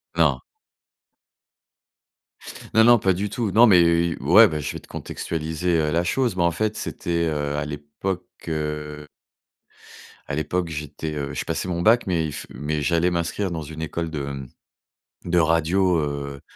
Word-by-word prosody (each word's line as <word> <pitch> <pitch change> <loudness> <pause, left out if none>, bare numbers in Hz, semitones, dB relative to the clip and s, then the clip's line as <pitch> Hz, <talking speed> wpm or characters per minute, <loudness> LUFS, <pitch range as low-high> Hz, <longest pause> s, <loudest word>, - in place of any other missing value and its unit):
Non. - - +3 2.3
Non, 110 - +6
non, 120 0 +7
pas 95 -2 +2
du 100 +3 -2
tout. 105 -1 -2
Non, 120 +4 +7
mais 90 -5 +7
heu, 85 0 +3
i 85 - -2
ouais, - - +7
bah, 75 - -3
je 70 - -3
vais - - -6
te - - -19
contextualiser, 80 +2 -2
heu, 75 -1 +1
la 85 +2 +1
chose, 120 +4 0
mais 85 - +1
en 85 - +3
fait, 110 +5 -1
c'était, 85 -1 -2
heu, 75 -1 -2
à 75 - -2
l'époque, 75 +6 -4 0.3
heu 75 -1 -4 1.2
à - - -4
l'époque, 85 +3 -1
j'étais, 75 0 -5
heu, 70 -1 -4
je - - -3
passais - - -3
mon 85 -1 -2
bac, 115 +1 +4
mais 85 -3 +1
il 75 - -4
f - - -7
mais 75 +1 -3
j'allais 85 +3 +2
m'inscrire 85 +3 -2
dans 80 -2 -3
une 80 +2 -8
école 85 0 -3
de, 75 -3 -4
hem, 70 -2 -6 0.8
de 90 0 +2
radio, 85 +3 +2
heu, 70 -2 -4
80 Hz, 180 wpm, -23 LUFS, 75-90 Hz, 2.3 s, non